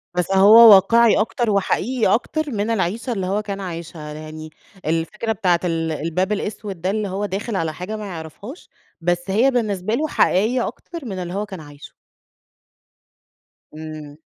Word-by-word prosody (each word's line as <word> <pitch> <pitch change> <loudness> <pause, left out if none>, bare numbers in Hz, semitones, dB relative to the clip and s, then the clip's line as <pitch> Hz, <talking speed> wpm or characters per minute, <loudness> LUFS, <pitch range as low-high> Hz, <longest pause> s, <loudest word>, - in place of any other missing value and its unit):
بس 180 +1 -1
هو 210 +4 +8
واقعي 230 +4 +4
أكتر 230 +1 0
وحقيقي 210 +2 +1
أكتر 300 +5 -1
من 210 -1 -2
العيشة 225 +5 -1
اللي 195 -4 -3
هو 200 +3 0
كان 200 -2 -5
عايشها، 165 -4 -7
يعني 155 +1 -9 0.4
الفكرة 165 +8 -2
بتاعة 185 -5 +1
ال 165 -2 -1
الباب 165 +5 -2
الأسود 205 -3 -4
ده 185 - 0
اللي 210 +1 -1
هو 195 +2 -3
داخل 205 +3 -4
على 165 -4 -1
حاجة 180 +6 -6
ما 215 - -6
يعرفهاش، 190 - -9 0.3
بس 175 +2 -1
هي 230 +8 +3
بالنسبة 215 -5 -1
له 310 +5 -1
حقيقيّة 235 -1 +2
أكتر 335 -5 -9
من 195 -5 -5
اللي 175 -1 -5
هو 205 +2 -2
كان 190 -4 -9
عايشه. 145 -1 -13 1.8
إمم. 155 -2 -9
195 Hz, 160 wpm, -21 LUFS, 170-220 Hz, 1.8 s, هو